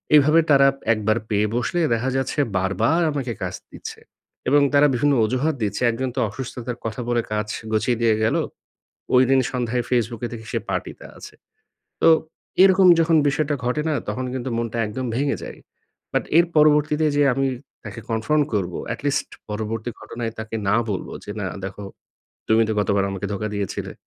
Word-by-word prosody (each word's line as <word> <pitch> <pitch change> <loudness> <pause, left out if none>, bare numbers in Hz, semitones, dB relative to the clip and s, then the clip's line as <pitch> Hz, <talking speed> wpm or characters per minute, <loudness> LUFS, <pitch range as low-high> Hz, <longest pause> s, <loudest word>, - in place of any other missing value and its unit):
এভাবে 150 +3 +6
তারা 135 -1 +6 0.3
একবার 110 +1 0
পেয়ে 105 0 +2
বসলে 125 +8 -1
দেখা 120 +3 0
যাচ্ছে 135 +2 -2 0.2
বারবার 110 - +1
আমাকে 135 -4 -3
কাজ 90 - -3 0.2
দিচ্ছে - - -9 0.5
এবং 145 +1 +5
তারা 145 +1 +6
বিভিন্ন 145 +4 +2
অজুহাত 135 +7 0
দিচ্ছে 105 +4 -2
একজন 130 +3 -2
তো - - -1
অসুস্থতার 125 +1 -6
কথা 115 +2 -3
বলে 120 -1 +2
কাজ 105 0 -1 0.2
গুছিয়ে 115 +2 +1
দিয়ে 115 -2 +4
গেলো। - - +2 0.7
ঐদিন 130 +1 +5
সন্ধ্যায় 125 -2 -1
ফেসবুকে 120 -1 0
দেখি 110 -1 -8
সে - - +1
পার্টিতে - - -4
আছে। - - -11 0.7
তো - - +6 0.5
এরকম 190 -1 +6
যখন 165 0 +3
বিষয়টা 145 +1 0
ঘটে 125 +5 0
না 155 - +1
তখন 130 - -2
কিন্তু 130 0 -3
মনটা 115 0 -3
একদম 125 +4 -4
ভেঙে 140 +2 0
যায়। - - -8 0.5
বাট - - 0
এর 170 - +5
পরবর্তীতে 150 0 +4
যে 145 - +4
আমি 135 0 +1 0.4
তাকে 110 +1 -7
কনফ্রন্ট 115 +7 +1
করবো, 95 -4 -1 0.2
এটলিস্ট - - -2 0.2
পরবর্তী 110 +2 -3
ঘটনায় 115 -1 -5
তাকে 110 0 -6
না 105 - +4
বলবো 95 - -4
যে - - -8
না 95 - -2 0.2
দেখো 95 +1 -6 0.6
তুমি 110 +1 +5
তো - - +1
গতবার 100 0 +1
আমাকে 95 +1 -4
ধোকা 105 +2 -3
দিয়েছিলে। 100 -2 -4
120 Hz, 165 wpm, -22 LUFS, 110-140 Hz, 0.7 s, এভাবে